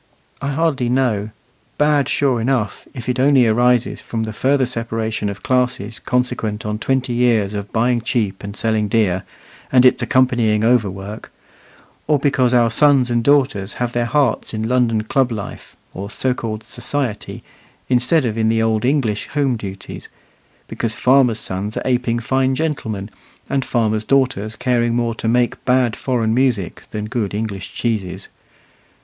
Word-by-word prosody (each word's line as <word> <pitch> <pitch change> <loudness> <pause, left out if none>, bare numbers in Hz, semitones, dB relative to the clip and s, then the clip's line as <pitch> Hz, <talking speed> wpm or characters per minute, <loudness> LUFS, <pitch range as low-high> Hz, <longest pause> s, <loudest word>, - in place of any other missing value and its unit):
I 140 - -3
hardly 145 -5 0
know. 120 -5 +1 0.5
Bad, 150 -2 +2
sure 130 -5 +1
enough, 115 -4 -1
if 120 -3 -7
it 125 0 -1
only 135 -2 +5
arises 120 +2 +2
from 115 -1 -3
the 110 -1 -4
further 135 +3 +2
separation 115 -3 -3
of 100 - -8
classes 125 -4 0
consequent 125 -4 -1
on 105 0 -3
twenty 130 0 0
years 115 -4 +2
of 100 -1 -5
buying 120 +1 +1
cheap 110 -5 -2
and 100 0 -6
selling 110 -1 0
dear, 100 -4 +1 0.5
and 125 -1 +5
its 125 - +5
accompanying 120 -4 +2
overwork; 105 -3 -1 0.8
or 150 -1 +3
because 135 -3 +2
our 120 -2 +3
sons 135 0 +4
and 120 -1 +1
daughters 135 -7 +2
have 120 -1 -3
their 120 -1 0
hearts 135 -4 0
in 110 +1 -2
London 115 -3 +1
club 130 +3 +1
life, 105 -3 -7 0.2
or 100 +2 -6
so 130 +4 -1
called 110 -3 -5
"society," 130 -7 -3 0.4
instead 130 +4 +2
of 115 -1 -2
in 110 0 +2
the 115 0 +2
old 110 0 +1
English 125 -6 0
home 140 -4 0
duties; 95 -3 -8 0.6
because 115 -1 -3
farmers' 125 -4 +3
sons 100 +3 -4
are - - -2
apeing 125 -2 +1
fine 130 +3 +1
gentlemen, 110 -10 -3 0.4
and 135 -1 +1
farmers' 110 -4 0
daughters 125 -4 +1
caring 120 -2 +1
more 120 -1 0
to 110 - -5
make 120 +1 +1
bad 125 -3 +2
foreign 115 -4 0
music 120 -8 0
than 105 0 -4
good 105 -3 -3
English 105 -3 -4
cheeses. 105 -7 -3
120 Hz, 155 wpm, -19 LUFS, 110-130 Hz, 0.8 s, only